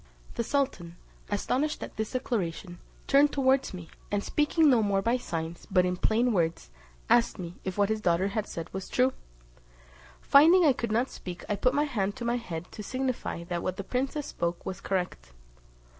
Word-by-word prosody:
The - - -1
sultan, 230 -11 -1 0.3
astonished 260 +9 -1
at - - -8
this 220 +2 -3
declaration, 180 -7 -3 0.3
turned 285 +1 +5
towards 265 -1 +2
me, 175 -3 -9 0.2
and 205 0 0
speaking 305 +2 +2
no 250 -5 +5
more 200 -2 +1
by 235 +4 +2
signs, 165 -7 -5
but 185 -2 +4
in 180 0 0
plain 230 +6 +2
words, 165 - -1 0.4
asked 235 -2 +3
me, 175 -2 -7
if 190 0 -4
what 200 0 +3
his 220 0 -1
daughter 185 +2 +1
said 165 -4 -7
was 190 0 -5
true? 255 +1 +2 1.1
Finding 330 +6 +6
I 285 - +6
could 235 -3 -3
not 240 +4 +1
speak, 180 -1 -8
I 210 - 0
put 250 +6 +1
my 290 - +3
hand 205 -9 -1
to 240 - -6
my 235 +1 +1
head' 175 -7 -6
to - - -8
signify 255 -6 -3
that 175 0 -3
what 185 - -3
the 200 - -4
princess 270 +7 -2
spoke 170 0 -3
was 190 +1 -5
correct. 180 - -3
210 Hz, 185 wpm, -28 LUFS, 180-260 Hz, 1.1 s, Finding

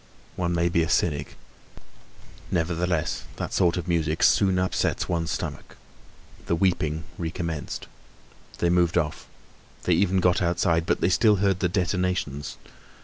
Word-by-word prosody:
One 85 -1 -1
may 85 0 +2
be 85 -1 +2
a 80 - -1
cynic; 75 -4 0 1.1
nevertheless 85 -1 -1
that - - -5
sort 85 0 +2
of 90 -1 -4
music 80 -2 0
soon 95 -2 +4
upsets 90 0 0
one's 85 -2 -1
stomach. - - -5 0.7
The 85 - +2
weeping 80 -3 0 0.2
recommenced. 85 -2 -4 0.7
They 85 - +1
moved 90 -1 +2
off, 75 -3 -2 0.6
they 90 - +2
even 95 +2 +2
got 90 0 +2
outside, 85 -1 +1
but - - +1
they 85 - +3
still 105 +3 +4
heard 95 -1 +1
the 90 - +1
detonations. 90 -5 -1
85 Hz, 140 wpm, -25 LUFS, 80-90 Hz, 1.1 s, soon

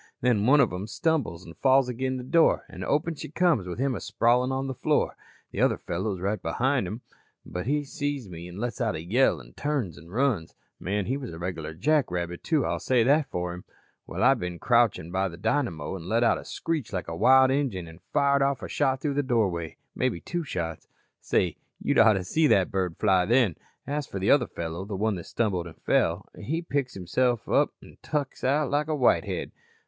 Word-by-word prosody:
"Then 115 -3 +2
one 145 +3 +6
of - - +3
'em 95 +3 -4
stumbles 120 - -1
an' 85 - -10
falls 135 +3 +3
agin 130 +1 -2
the 125 - -6
door 165 +6 +3
an' - - -8
open 150 +3 0
she 150 - -8
comes 160 - +2
with 90 - -5
him 135 +1 0
a 105 - -3
sprawlin' 120 +5 +2
on 135 +1 -1
the 135 - -3
floor. - - 0 0.4
The - - -3
other - - +3
fellow 95 +5 -3
is - - -9
right 100 +4 -1
behin' 130 -5 0
him 110 +6 -6 0.4
but 90 +5 -5
he 145 +2 +1
sees 145 - -3
me 85 -1 -8
an' 90 +1 -10
lets 120 +4 -3
out 110 -6 0
a 80 - -5
yell 105 - +2
an' - - -14
turns 135 - -2
an' 80 - -15
runs. 115 -6 0 0.2
Man, 100 +1 -1
he 130 +6 -1
was 130 -4 -6
a 80 - -8
regular 80 -3 -5
jackrabbit, 90 - 0
too. 155 -5 +1
I'll - - -1
say 125 -3 +2
that 145 +4 +3
for 90 0 -3
'im. 90 - -9 0.4
"Well, - - -3
I - - +7
been 90 -1 -4
crouchin' 115 -7 +2
by 95 +1 +1
the 85 -2 -8
dynamo 90 - -1
an' 90 -1 -8
let 115 +2 +2
out - - +3
a - - -11
screech 160 -8 -3
like 90 -3 -3
wild 130 +10 +5
Injun 125 -11 -1
an' 80 +1 -12
fired 140 -1 +3
off 135 -1 +1
a - - -4
shot 130 0 0
through 145 -2 -1
the 145 - +1
doorway. 95 - -1 0.2
Maybe 85 - -1
two 175 - -3
shots. 85 - -4 0.3
Say, 90 -4 0 0.2
you'd - - +1
oughta 110 -4 +5
seen 155 - +2
that 95 -2 +3
bird 90 -3 -1
fly 95 -4 +3
then. 115 -7 +3 0.3
As 145 -1 -3
for - - -6
the 95 +1 +2
other 140 -3 +4
fellow, 85 +2 -5
the 100 0 -5
one 110 +3 +1
that 85 - -8
stumbled 95 -7 -1
an' 80 - -11
fell, - - +1
he 165 +5 -2
picks 140 -5 -2
himself 120 +6 0
up - - +2
an' - - -15
tuk 145 -3 -2
out 145 +2 +1
like 145 +1 +1
a 155 - 0
whitehead. 130 -4 +1
115 Hz, 215 wpm, -27 LUFS, 90-140 Hz, 0.4 s, I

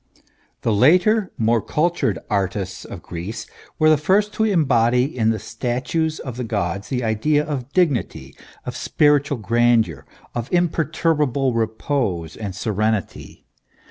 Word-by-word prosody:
The 115 - +1
later 180 - +4
more 115 0 +2
cultured 160 - 0
artists 95 -2 -2
of - - -9
Greece 95 +7 -6 0.3
were 155 - +3
the 155 -2 +5
first 200 +7 +2
to 220 - 0
embody 125 - +3
in 110 -3 +2
the 110 - +1
statues 130 - -2
of 125 -3 -7
the 125 - -3
gods 100 -3 -3
the 125 -2 -1
ideas 145 +7 +1
of 135 -3 -4
dignity, 150 - 0 0.3
of - - -5
spiritual 145 -2 +2
grandeur, 115 -6 +1 0.3
of 120 -1 -4
imperturbable 155 -6 +1
repose 110 - -2
and 100 -4 -6
serenity. 105 +1 -2
120 Hz, 130 wpm, -21 LUFS, 110-150 Hz, 0.3 s, the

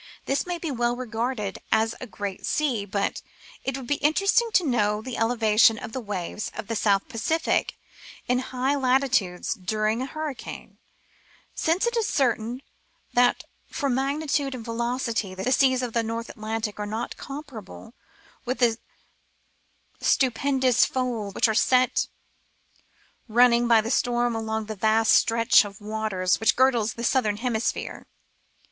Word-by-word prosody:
This 275 +5 -1
may 350 -1 -3
well 240 -1 0
be - - -10
regarded 230 -3 -3
as 220 +1 +2
a 255 - -6
great 200 -3 -5
isea, 245 -10 -1
but 200 0 -1 0.4
it 270 0 -2
would 265 - -7
be 290 +4 0
interesting 395 +10 +2
to 360 - +4
know 210 -6 +1
the 245 +2 -6
elevation 225 -1 +4
of 220 - -7
the 260 - -3
waves 205 -2 -4
of - - -5
the 225 +2 -3
South 200 -2 +2
Pacific 290 +7 -1 0.5
in 250 0 +2
high 260 +1 -1
latitudes 255 -9 +1
during 215 +3 -1
a 260 - -3
hurricane, 310 -2 -7 0.7
since 335 +6 +1
it 475 0 -1
is 455 -2 +1
certain 245 -1 0 0.5
that 245 0 +3 0.2
for 285 -3 -2
magnitude 275 +1 -1
and 230 -3 -8
velocity 230 -4 -2
the 190 +7 -2
seas 260 -2 +3
of 240 -2 -4
the 230 - +2
North 230 +1 -4
Atlantic 215 -1 -4
are 210 - -3
not 220 +3 -4
com 285 +2 -7
parable 225 -4 -11 0.5
with 255 +1 -2
the 235 -2 +2 1.2
stupendous 260 -1 +2
folds 235 -6 -2
which - - +3
are 220 - +1
set 255 +3 +3 1.2
running 240 +1 +4
by 230 -2 +5
the 225 +2 -4
storm 240 -1 +1
along 220 -1 -2
the 215 - -5
vast 220 +2 +2
stretch 230 0 +5
of 200 0 -9
waters 210 -4 -1
which 225 +2 +3
girdles 245 -4 +2
the 235 - -6
Southern 225 -4 +1
Hemisphere. 230 -1 -2
235 Hz, 150 wpm, -25 LUFS, 220-260 Hz, 1.2 s, by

